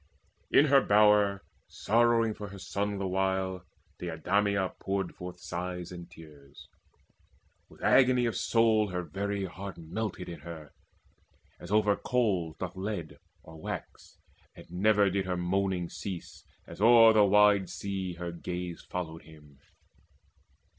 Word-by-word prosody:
In 145 - +5
her 140 -2 +5
bower, 105 -2 +4 0.2
sorrowing 115 0 +2
for 105 -1 -8
her 100 0 -10
son 100 +2 -3
the 100 - -3
while, 95 -1 -1 0.4
Deidameia 95 +3 0
poured 95 -2 -2
forth 90 0 -9
sighs 90 -1 -5
and 85 -1 -9
tears. 75 -4 -15 1.0
With - - -16
agony 125 -2 +4
of 115 - -1
soul 110 -2 +2
her 90 -2 -3
very 100 +2 -3
heart 95 +1 -8
Melted 90 +3 -5
in 85 -2 -7
her, 80 -1 -10 0.9
as 90 - -10
over 105 -1 +3
coals 100 -12 0
doth 90 -1 -5
lead 100 +3 -5 0.2
Or 80 -1 -13
wax, - - -7 0.4
and - - -13
never 100 +2 +3
did 95 0 -1
her 90 -1 -1
moaning 90 0 -1
cease, 90 0 -8 0.2
As - - -11
o'er 115 0 +7
the 105 -1 +5
wide 100 -1 +4
sea 95 -2 -4
her 85 0 -5
gaze 90 0 -6
followed 80 -3 -6
him. 75 -3 -17
95 Hz, 135 wpm, -29 LUFS, 90-105 Hz, 1.0 s, o'er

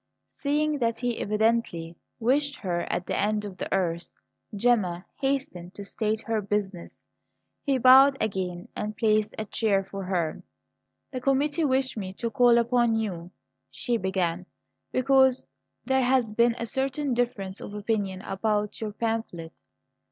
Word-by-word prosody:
Seeing 300 +1 +1
that 230 -2 0
he 245 -2 -1
evidently 210 -6 0 0.2
wished 280 +5 +2
her 175 -8 -3
at 180 - -2
the - - -2
end 210 +1 0
of 195 -3 -8
the - - -4
earth, 175 -3 -1 0.4
Gemma 195 -6 +1
hastened 265 -11 -2
to 200 - -7
state 215 +1 -1
her 225 -1 -1
business. 200 -3 -4 0.6
He 275 -2 +1
bowed 265 +2 +7
again 185 -4 -2
and 210 0 -4
placed 215 -2 +2
a 220 - -3
chair 200 -2 +1
for 195 0 -7
her. 175 -4 -1 0.7
"The 255 -2 -4
committee 285 +4 +1
wished 260 -2 +1
me 190 -3 -4
to 230 +3 -4
call 245 -2 +5
upon 235 -1 +2
you," 185 -6 -3 0.4
she 235 - -1
began, 185 -2 -1 0.4
"because 265 0 +3 0.4
there 265 +1 +2
has 250 -3 +2
been 235 +2 +3
a 230 - -3
certain 270 +3 -1
difference 220 -6 -2
of 205 - -8
opinion 205 -3 -2
about 210 +1 -1
your 215 -2 -3
pamphlet." 220 -8 -3
220 Hz, 145 wpm, -26 LUFS, 195-250 Hz, 0.7 s, bowed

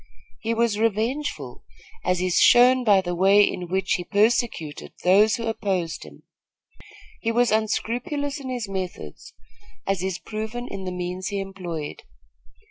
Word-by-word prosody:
He 230 +1 -1
was 225 -2 +1
revengeful, 230 +7 -2 0.4
as 180 -1 +1
is 185 -1 +2
shown 250 +1 +6
by 205 -4 +5
the 175 -1 -3
way 195 +3 +5
in 180 -3 -1
which 190 0 -1
he 175 - -1
persecuted 210 - 0
those 205 +4 +5
who 230 - -4
opposed 195 -7 -2
him. 75 -1 -15 1.0
He 230 - 0
was 240 0 +2
unscrupulous 245 +7 -1
in 265 -2 -7
his 245 -4 -3
methods, 185 - -6 0.5
as 195 -2 -1
is 190 -1 -2
proven 220 +5 -5
in 195 -5 -6
the 185 - -3
means 180 +1 -4
he 200 +1 -2
employed. 180 -6 -6
205 Hz, 145 wpm, -24 LUFS, 180-230 Hz, 1.0 s, shown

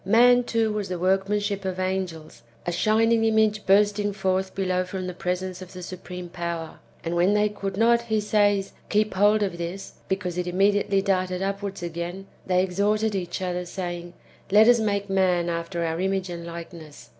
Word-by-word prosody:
Man, 245 +4 +5
too, 225 -2 +1
was 210 -2 -3
the 180 - -2
w^orkmanship 195 +3 0
of 185 -1 -3
angels, 185 -8 -3 0.2
a 175 - -1
shining 225 +4 +3
image 220 -1 +2
bursting 205 +1 +3
forth 190 -1 -1
below 185 -1 0
from 185 0 -5
the 180 - -4
presence 180 +1 -3
of 185 0 -10
the 180 -1 -8
supreme 180 0 -7
power; 170 -2 -5 0.2
and 170 +1 -2
when 180 +4 +3
they 210 0 +3
could 195 -2 -5
not, 235 +2 +4
he 220 -2 0
says, 205 -2 +2 0.2
keep 210 +1 +1
hold 205 +2 +4
of 180 -4 -3
this, 175 +3 -5
because 180 -2 -2
it 180 - -2
im 180 +1 -3
mediately 200 0 +3
darted 185 -1 0
upw^ards 195 -1 -3
again, 175 +3 -5 0.2
they 185 0 +3
exhorted 205 +4 +1
each 185 -1 -3
other, 180 -1 -2
saying, 175 -1 -5 0.2
" - - -24
Let 215 +2 +7
us 240 -1 +6
make 200 -2 0
man 185 -3 +2
after 170 0 -2
our 165 0 -2
image 190 -1 -1
and 170 0 -6
likeness." 170 -3 -10
190 Hz, 185 wpm, -25 LUFS, 180-205 Hz, 0.2 s, Let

